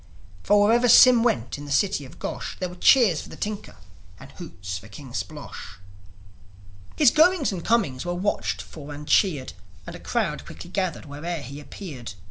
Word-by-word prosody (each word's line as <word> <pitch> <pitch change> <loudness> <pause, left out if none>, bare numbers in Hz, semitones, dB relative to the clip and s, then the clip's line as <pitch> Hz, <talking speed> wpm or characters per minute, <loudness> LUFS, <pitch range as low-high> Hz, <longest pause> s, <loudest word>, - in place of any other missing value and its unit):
For, 205 0 +3
wherever 240 +3 +4
Sym 250 0 +8
went 130 - 0
in 145 - -8
the 145 - -8
city 150 0 +1
of 130 - -14
Gosh, - - -5
There 185 - -3
were - - -10
cheers 200 - +4
for - - -12
the - - -10
tinker, 210 0 -5 0.4
and - - -13
hoots 90 +1 -7
for 110 - -14
King 120 +4 -11
Splosh. 145 - -7 1.2
His 290 -6 +5
goings 325 -3 +4
and 180 -4 -5
comings 195 - +1
were 175 0 -3
watched 105 - -2
for 145 - -10
and 150 +1 -10
cheered; 150 -5 +2 0.3
And - - -8
a - - -9
crowd - - -2
quickly 175 - -11
gathered 185 -6 -2
where'er 155 +3 -5
he 140 +3 -8
appeared. 140 - -9
165 Hz, 180 wpm, -24 LUFS, 135-205 Hz, 1.2 s, Sym